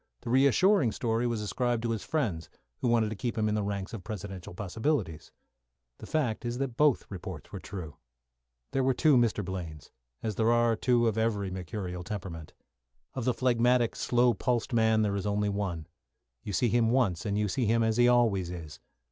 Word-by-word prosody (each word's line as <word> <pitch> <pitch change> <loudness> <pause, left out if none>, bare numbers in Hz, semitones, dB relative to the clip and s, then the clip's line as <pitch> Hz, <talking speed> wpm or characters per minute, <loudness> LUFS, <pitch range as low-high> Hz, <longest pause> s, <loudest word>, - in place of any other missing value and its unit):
The 115 - -5
reassuring 140 - +4
story 115 0 0
was 115 -2 -2
ascribed 120 +2 -1
to 115 - 0
his 110 -3 -3
friends, 105 - -2 0.3
who - - -1
wanted 115 -2 +2
to - - -3
keep 120 +3 -3
him 110 -1 +1
in 105 - 0
the 105 - 0
ranks 100 0 -4
of 105 -5 -6
Presidential 95 -4 -7
possibilities. 105 - -2 0.7
The - - -9
fact 130 -9 -1
is 120 0 -3
that 135 0 -1
both 150 -1 +3
reports 95 -4 -7
were 100 - -6
true. 90 -7 -8 0.7
There 135 - +1
were 130 0 +2
two 155 0 +4
Mr. 115 -5 +2
Blaines, 85 -5 -6 0.3
as 110 - -1
there 115 +1 +3
are 120 -1 +3
two 120 +1 +2
of 110 0 0
every 105 -4 0
mercurial 90 0 -5
temperament. 90 -5 -7 0.6
Of 125 - -4
the 125 - +2
phlegmatic, 120 -1 +2
slow 120 0 +2
pulsed 125 +1 -1
man 110 -1 +3
there 100 -1 0
is 100 +1 -2
only 105 0 0
one. 95 -6 -3 0.6
You 105 - -6
see 120 +5 +1
him 115 0 +3
once 115 -9 +1
and 105 -2 -1
you 105 0 +1
see 115 +4 -1
him 115 +1 +3
as 110 0 +1
he 120 0 +5
always 115 -7 +3
is. 85 -4 -8
110 Hz, 195 wpm, -29 LUFS, 100-120 Hz, 0.7 s, he